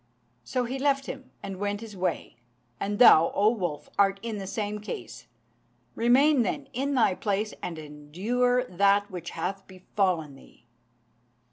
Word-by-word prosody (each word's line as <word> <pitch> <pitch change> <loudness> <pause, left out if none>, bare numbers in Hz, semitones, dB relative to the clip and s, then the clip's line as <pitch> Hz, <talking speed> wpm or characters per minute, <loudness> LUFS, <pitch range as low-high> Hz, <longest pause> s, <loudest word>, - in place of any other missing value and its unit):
So 250 - -1
he 255 +3 -4
left 275 0 +1
him 260 0 -8
and 195 -1 -6
went 205 0 -2
his 220 -3 -9
way. 185 -9 -3 0.4
And 205 +1 -2
thou, 165 -9 +7
O 210 +2 +4
wolf, 175 -10 -4
art 195 0 +3
in 225 -3 -4
the 195 - -6
same 210 +1 -3
case. 210 - -8 0.7
Remain, 260 +4 +4
then, 275 +6 -2
in 275 +3 -1
thy 230 -6 +4
place, 205 +2 -2
and 170 -2 -5
endure 185 +13 -1
that 200 +1 +2
which 175 -2 -6
hath 195 +1 -4
befallen 185 -5 -1
thee." 135 -3 -19
205 Hz, 150 wpm, -27 LUFS, 185-245 Hz, 0.7 s, thou